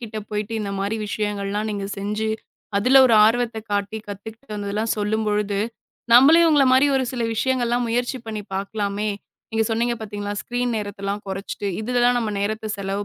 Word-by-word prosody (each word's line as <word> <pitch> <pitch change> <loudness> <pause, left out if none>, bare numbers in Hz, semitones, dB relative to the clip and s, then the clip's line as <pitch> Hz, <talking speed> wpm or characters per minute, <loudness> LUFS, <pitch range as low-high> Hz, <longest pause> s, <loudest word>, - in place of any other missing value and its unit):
கிட்ட 225 -2 -7
போயிட்டு 210 +1 -3
இந்த 200 -2 -3
மாரி 200 +3 -1
விஷயங்கள்லாம் 205 0 -2
நீங்கச் 200 0 -4
செஞ்சு 210 +2 -2 0.5
அதுல 255 +7 +6
ஒரு 235 - +4
ஆர்வத்தக் 225 -1 0
காட்டி 205 +1 -1
கத்துக்கிட்டு 215 +4 -9
வந்ததுலாம் 210 +2 -2
சொல்லும்பொழுது, 210 -1 0 0.5
நம்மளையும் 315 +8 +8
உங்கள 290 -3 +5
மாரி 260 +2 +5
ஒரு 260 - +1
சில 245 -2 -3
விஷயங்கள்லாம் 245 0 +1
முயற்சி 245 +3 -1
பண்ணி 215 -2 -4
பாக்கலாமே. 200 +1 -2 0.4
நீங்கச் 225 -1 0
சொன்னீங்க 235 +2 +1
பார்த்தீங்களா, 205 -1 -4
ஸ்கிரீன் 245 0 -1
நேரத்தலாம் 205 -1 -4
கொறச்சிட்டு, 195 +1 -5
இதுலலாம் 245 +2 +2
நம்ம 225 -3 -1
நேரத்த 215 +1 -2
செலவு 200 +1 -3
215 Hz, 150 wpm, -22 LUFS, 205-240 Hz, 0.5 s, நம்மளையும்